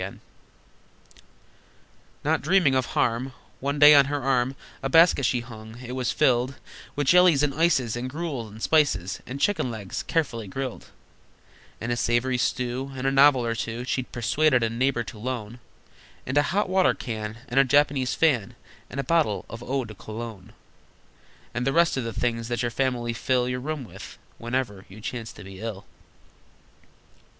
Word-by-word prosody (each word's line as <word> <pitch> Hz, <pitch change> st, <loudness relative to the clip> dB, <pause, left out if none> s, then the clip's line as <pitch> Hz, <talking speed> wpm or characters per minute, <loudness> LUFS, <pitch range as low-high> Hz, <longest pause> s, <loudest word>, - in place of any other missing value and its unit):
Not -, -, +1 dB
dreaming 185 Hz, -8 st, +3 dB
of 130 Hz, -2 st, +1 dB
harm, 125 Hz, +3 st, 0 dB, 0.3 s
One 140 Hz, +2 st, -2 dB
day 150 Hz, +1 st, +9 dB
on 140 Hz, -1 st, +7 dB
her 145 Hz, 0 st, -3 dB
arm 130 Hz, 0 st, +1 dB, 0.3 s
A 135 Hz, -, -2 dB
basket 165 Hz, -4 st, +5 dB
she 125 Hz, -2 st, 0 dB
hung. 110 Hz, -1 st, -11 dB
It 125 Hz, -1 st, -8 dB
was 125 Hz, -3 st, -1 dB
filled 130 Hz, -1 st, +2 dB, 0.4 s
With 145 Hz, -, -1 dB
jellies, 175 Hz, -2 st, +5 dB
and 145 Hz, -2 st, +1 dB
ices, 135 Hz, -7 st, +2 dB
And 125 Hz, +2 st, -4 dB
gruel, 145 Hz, -6 st, -4 dB
and 110 Hz, +1 st, -11 dB
spices, 135 Hz, -, +2 dB
And 130 Hz, +3 st, -6 dB
chicken 170 Hz, -4 st, +1 dB
legs, 105 Hz, -5 st, -5 dB
carefully 125 Hz, -, -2 dB
grilled, 130 Hz, +5 st, -5 dB, 0.9 s
And 115 Hz, +2 st, -3 dB
a -, -, +1 dB
savory 120 Hz, +2 st, +1 dB
stew, 125 Hz, +3 st, -1 dB
And 130 Hz, 0 st, -5 dB
a 135 Hz, -, +3 dB
novel 135 Hz, -2 st, +5 dB
or 115 Hz, -, 0 dB
two 115 Hz, +1 st, -4 dB
She'd 130 Hz, 0 st, -3 dB
persuaded 125 Hz, +3 st, +2 dB
a 115 Hz, -, 0 dB
neighbor 120 Hz, +1 st, 0 dB
to 115 Hz, -2 st, -10 dB
loan, 120 Hz, -1 st, -5 dB, 0.7 s
And 130 Hz, -, -3 dB
a 145 Hz, -, +6 dB
hot 205 Hz, +4 st, +1 dB
water 185 Hz, 0 st, +3 dB
can, 110 Hz, -2 st, -5 dB
And 125 Hz, +3 st, +2 dB
a -, -, +7 dB
Japanese 135 Hz, -1 st, +2 dB
fan, 130 Hz, -11 st, +1 dB, 0.3 s
And 140 Hz, -, -6 dB
a -, -, 0 dB
bottle 155 Hz, -7 st, +1 dB
of 115 Hz, +1 st, -7 dB
eau 130 Hz, +1 st, -2 dB
de 110 Hz, -, -9 dB
cologne, 110 Hz, -1 st, -8 dB, 1.0 s
And 120 Hz, +2 st, -2 dB
the 135 Hz, -, +1 dB
rest 170 Hz, 0 st, +3 dB
of 130 Hz, -, -2 dB
the 115 Hz, -, -3 dB
things 115 Hz, +1 st, -2 dB
that 120 Hz, +1 st, -2 dB
your 120 Hz, -, -1 dB
family 120 Hz, -2 st, -1 dB
fill 125 Hz, +1 st, 0 dB
Your 125 Hz, 0 st, -2 dB
room 150 Hz, +1 st, -4 dB
with, 115 Hz, -, -11 dB, 0.2 s
whenever 115 Hz, -5 st, -3 dB
you 100 Hz, +3 st, -12 dB
chance 115 Hz, +1 st, -5 dB
to -, -, -12 dB
be 95 Hz, -1 st, -11 dB
ill! 105 Hz, -2 st, -6 dB
125 Hz, 175 wpm, -25 LUFS, 115-140 Hz, 1.0 s, day